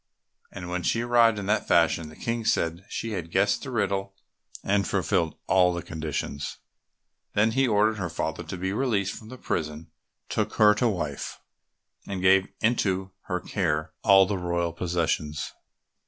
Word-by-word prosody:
And 90 -3 -7
when 90 0 -2
she 115 +7 +1
arrived 120 -2 +4
in 100 - -4
that 105 +2 +1
fashion, 85 -1 +3
the 75 - -13
King 115 +4 -2
said 85 -3 0
she 115 - -4
had 90 -5 -4
guessed - - +2
the - - -6
riddle 100 0 -1 0.5
and 100 0 +1
fulfilled 90 -4 0
all 90 -1 +4
the 85 - -4
conditions. 75 -3 -4 0.8
Then 110 +2 +4
he 135 +3 +2
ordered 105 0 +2
her 90 -3 -2
father 80 0 -3
to 90 +4 -6
be 95 +2 -2
released 105 -5 0
from 110 - -11
the 130 - -9
prison, 75 -6 -3 0.4
took - - -1
her 105 -1 +6
to 115 +3 +1
wife, 75 -8 -4 0.7
and 100 -2 -3
gave 95 +1 +4
into 95 -4 +1
her 90 - -2
care 80 -5 -1
all 95 -2 +7
the 100 0 -2
royal 85 -1 -1
possessions. 85 -3 -2
95 Hz, 165 wpm, -26 LUFS, 85-105 Hz, 0.8 s, all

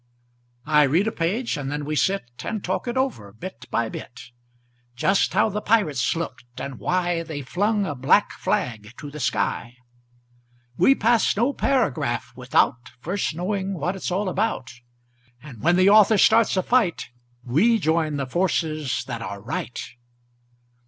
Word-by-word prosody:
I 150 0 +4
read 155 +8 +3
a 225 - 0
page, 200 +4 -1
and 140 -1 -4
then 145 0 -3
we 155 +1 -2
sit 195 +2 +1 0.2
And 215 -3 -4
talk 185 +6 -2
it 240 +2 -2
over, 255 - -2
bit 130 - -9
by 115 - 0
bit; 120 +2 -9 0.6
Just 190 +10 +2
how 215 +2 +4
the 210 +1 -3
pirates 155 - +1
looked, 125 -7 -6
and 140 -1 -6
why 175 -1 0
They 155 -4 -6
flung 205 - 0
a 150 - -3
black 130 - +3
flag 110 -2 -3
to 145 - -8
the 150 - -8
sky. 115 0 -1 1.0
We 270 - +5
pass 230 -3 +2
no 245 +6 +2
paragraph 250 - 0
without 120 0 +1
First 175 +3 -2
knowing 195 +2 -2
what 175 +4 -2
it's 190 - -4
all 190 +3 -1
about, 185 - -1 0.7
And 125 -6 -12
when 175 +2 +3
the 185 +2 +5
author 215 +1 +6
starts 220 -1 +4
a 185 - +2
fight 220 - +1 0.3
We 175 - +3
join 160 -4 0
the 135 - -2
forces 155 -3 -1
that 120 -3 -5
are 100 -2 -6
right. 115 +3 -5
170 Hz, 160 wpm, -23 LUFS, 130-205 Hz, 1.0 s, author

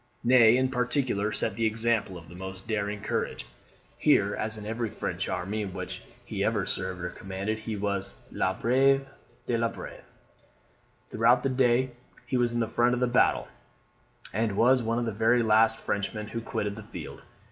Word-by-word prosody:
Ney, 120 -1 +6
in 130 0 +2
particular, 125 -4 0
set 105 -1 -1
the 115 0 +1
example 110 -4 0
of 85 -1 -12
the 80 - -12
most 95 +1 -8
daring 105 -1 -2
courage. - - -2 0.5
Here, - - +3
as 110 0 -1
in 105 - -8
every 115 +1 -2
French - - -3
army 100 +4 -2
in 95 -3 -5
which - - -5 0.2
he - - -3
ever - - +1
served 95 -1 -3
or 90 - -3
commanded, 95 +3 -4
he 110 0 -4
was 100 -8 -2 0.2
"le 95 0 -1
brave 135 +3 +3 0.4
des 115 -1 0
braves." - - -9 1.1
Throughout 120 +3 +4
the 135 - +1
day 130 0 +2 0.3
he 135 - -2
was 120 -1 +2
in 120 0 0
the 115 - 0
front 120 +2 +2
of - - -3
the 125 - +3
battle; 125 0 +2 0.9
and 105 -1 0
was 125 +2 +5
one 115 0 -1
of 120 - 0
the 115 - -1
very 115 +3 +3
last 110 0 +4
Frenchmen 105 +1 -3
who 115 - -4
quitted 105 -2 -3
the - - -6
field. - - -9
110 Hz, 180 wpm, -28 LUFS, 100-120 Hz, 1.1 s, Ney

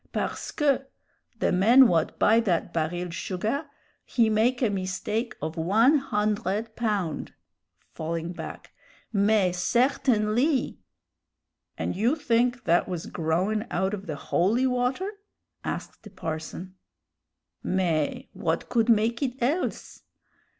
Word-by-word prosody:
Parceque, 275 -3 -1 0.5
the - - +1
man 235 +8 +7
what 165 -5 +1
buy 220 +2 +5
that 180 -6 0
baril 175 +2 -2
sugah 215 - -2 0.4
he 225 -3 +2
make 235 +4 +2
a 225 - +2
mistake 205 +4 -2
of 160 +1 -3
one 225 - +4
hundred 210 -2 -1
pound" 205 -9 -2 0.6
falling 165 +2 -4
back - - -8 0.4
"mais 200 -3 +2
certainlee!" 250 - +1 1.0
"And - - -2
you 230 - +2
think 245 -4 +1
that 170 +1 +2
was 175 -3 -4
growin' 180 +7 -1
out 190 +2 0
of 195 -2 -5
the 155 - -3
holy 205 - +1
water?" 255 +10 0 0.5
asked - - -5
the 210 - -12
parson. 175 0 -6 0.9
"Mais, 180 - 0
what - - -2
could 230 -1 +2
make 230 +2 +3
it 260 -1 -2
else? 290 +9 -2
215 Hz, 115 wpm, -26 LUFS, 180-245 Hz, 1.0 s, man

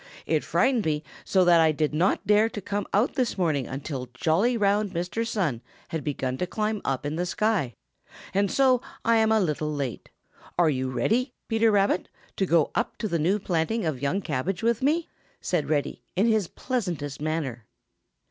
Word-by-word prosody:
It - - +1
frightened 250 -5 +2
me 155 -2 -1 0.2
so 190 -2 +3
that 170 -1 +6
I 160 -1 +5
did 155 0 -1
not 175 +6 +1
dare 210 +2 +4
to 215 - -6
come 205 +1 -3
out 210 +6 +2
this 255 -7 -1
morning 155 -8 0
until 135 -2 -5
jolly, 185 - +2
round 205 -1 +1
Mr. 180 +7 -2
Sun 155 - -1 0.3
had 160 -2 -3
begun 130 -3 -2
to 180 - -1
climb 215 +1 -2
up 135 +1 -2
in 150 +2 -2
the 175 - 0
sky, 190 - 0 0.6
and 200 +1 +2
so 260 -2 +4 0.2
I 230 0 +4
am 220 0 +3
a 220 - +4
little 155 -4 -1
late. 140 -5 -4 0.5
Are 170 -3 +4
you 130 -1 -1
ready, 225 - 0
Peter 225 0 +3
Rabbit, 200 -3 +2 0.3
to 190 - +1
go 165 -3 +3
up 235 - -1
to 215 - -2
the 170 -4 -1
new 180 +7 +2
planting 185 +3 -1
of 145 -5 -2
young 160 +8 0
cabbage 170 - -2
with 235 0 +2
me?" 310 +5 +1 0.3
asked 150 - -1
Reddy, 145 -2 -1
in 195 +4 +3
his 220 -5 +2
pleasantest 170 - -3
manner. 145 -8 -3
180 Hz, 185 wpm, -26 LUFS, 150-220 Hz, 0.6 s, that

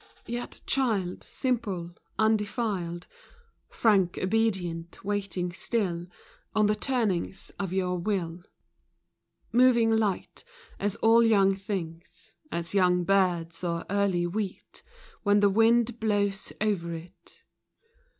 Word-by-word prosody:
Yet 240 +1 -5
child 215 -9 0
simple, 205 -10 -2 0.3
undefiled, 210 -5 0 0.6
Frank, 195 -6 +2
obedient, 185 -5 -1
waiting 195 -3 -2
still 175 -3 -2 0.5
On 215 -1 +4
the 210 - +3
turnings 210 -7 -1
of 195 -3 -2
your 180 -1 0
will. 175 -3 -2 1.1
Moving 235 -1 +5
light, 215 -4 -1 0.4
as 205 +1 -1
all 225 +1 +6
young 200 -4 +4
things, 185 -4 -6 0.2
As 170 +1 -3
young 180 -2 +3
birds, 175 -3 +1
or 170 -1 -2
early 200 -3 +1
wheat 195 +2 -5 0.4
When 205 0 +4
the 205 0 +5
wind 230 +2 +3
blows 205 -2 0
over 180 -6 -1
it. 165 +2 -13
195 Hz, 105 wpm, -28 LUFS, 175-220 Hz, 1.1 s, all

